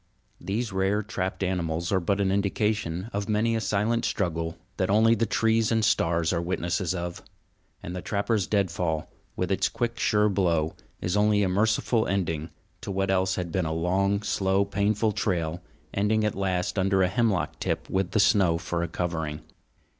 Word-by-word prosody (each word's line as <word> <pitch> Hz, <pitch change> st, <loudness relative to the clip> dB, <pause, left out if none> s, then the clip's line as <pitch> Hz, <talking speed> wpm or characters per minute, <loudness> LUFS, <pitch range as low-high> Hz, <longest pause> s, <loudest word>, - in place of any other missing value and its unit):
These 105 Hz, +2 st, -3 dB
rare 95 Hz, +3 st, +1 dB
trapped 95 Hz, -2 st, -3 dB
animals 85 Hz, -2 st, -1 dB
are 95 Hz, -, +3 dB
but 100 Hz, +3 st, 0 dB
an 95 Hz, -1 st, +2 dB
indication 100 Hz, -1 st, -1 dB
of 100 Hz, +1 st, -3 dB
many 110 Hz, +2 st, +2 dB
a 110 Hz, -, -1 dB
silent 110 Hz, +3 st, 0 dB
struggle 85 Hz, -7 st, -1 dB, 0.2 s
that 95 Hz, -, 0 dB
only 110 Hz, +3 st, +5 dB
the 115 Hz, 0 st, +1 dB
trees 110 Hz, +1 st, +2 dB
and 110 Hz, -1 st, +2 dB
stars 85 Hz, -4 st, +2 dB
are 85 Hz, -, 0 dB
witnesses 90 Hz, +1 st, -1 dB
of; 85 Hz, 0 st, -4 dB, 0.6 s
and 90 Hz, -, -5 dB
the 90 Hz, -, -4 dB
trapper's 100 Hz, -1 st, 0 dB
deadfall, 85 Hz, -6 st, -1 dB, 0.2 s
with 90 Hz, +1 st, -2 dB
its 95 Hz, +1 st, +2 dB
quick, 120 Hz, +1 st, -3 dB
sure 105 Hz, 0 st, +3 dB
blow, 85 Hz, -6 st, +1 dB, 0.3 s
is 90 Hz, +2 st, -1 dB
only 105 Hz, 0 st, +3 dB
a 95 Hz, -, +1 dB
merciful 110 Hz, +3 st, +1 dB
ending 80 Hz, -5 st, -1 dB, 0.3 s
to -, -, -7 dB
what 95 Hz, 0 st, 0 dB
else 95 Hz, 0 st, +1 dB
had 90 Hz, -2 st, -3 dB
been 90 Hz, -1 st, 0 dB
a 80 Hz, -, -2 dB
long, 95 Hz, +5 st, +1 dB
slow, 100 Hz, -1 st, +1 dB
painful 105 Hz, +2 st, +1 dB
trail, 85 Hz, -4 st, -1 dB, 0.3 s
ending 105 Hz, +2 st, +1 dB
at 105 Hz, -, 0 dB
last 95 Hz, 0 st, -1 dB
under 95 Hz, 0 st, +3 dB
a -, -, +3 dB
hemlock 100 Hz, -, 0 dB
tip -, -, -2 dB
with 95 Hz, -1 st, 0 dB
the 110 Hz, -, 0 dB
snow 95 Hz, -4 st, +4 dB
for 85 Hz, 0 st, -3 dB
a 85 Hz, -, -1 dB
covering. 80 Hz, -3 st, -3 dB
95 Hz, 175 wpm, -26 LUFS, 85-105 Hz, 0.6 s, only